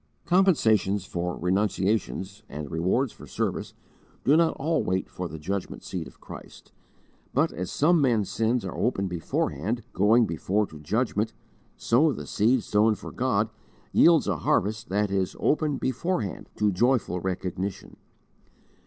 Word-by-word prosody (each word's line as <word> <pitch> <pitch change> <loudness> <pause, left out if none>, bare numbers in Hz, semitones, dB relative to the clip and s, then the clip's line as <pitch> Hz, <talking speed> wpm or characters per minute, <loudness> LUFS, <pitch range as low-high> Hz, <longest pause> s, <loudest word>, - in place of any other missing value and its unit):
Compensations 110 - +3
for 90 0 -3
renunciations, 100 +1 -1
and 75 -1 -6
rewards 95 +10 0
for - - -13
service, - - -3 0.5
do 145 - +5
not 165 0 +3
all 160 +4 +1
wait 95 +1 -1
for 90 - -4
the 80 - -8
judgment 95 +5 -4
seat - - -5
of - - -16
Christ, - - -12 0.6
but, - - +3
as 90 +1 -5
some 165 +2 +3
men's 115 -7 +2
sins 115 +2 0
are - - -5
open 105 -5 0
beforehand, 90 - -2
going 110 +4 +4
before 100 +4 0
to 80 -5 -12
judgment, 110 - -1 0.4
so 145 +7 +3
the - - -6
seed 115 +3 +2
sown 105 +1 +3
for - - -9
God - - 0 0.4
yields 165 -2 +5
a 95 -5 0
harvest 105 +9 0
that 100 +1 0
is 95 -2 -1
'open 150 -2 +1
beforehand' 130 - -2
to 105 -1 +2
joyful 115 -2 +1
recognition. 95 +1 -4
105 Hz, 145 wpm, -26 LUFS, 95-125 Hz, 0.6 s, do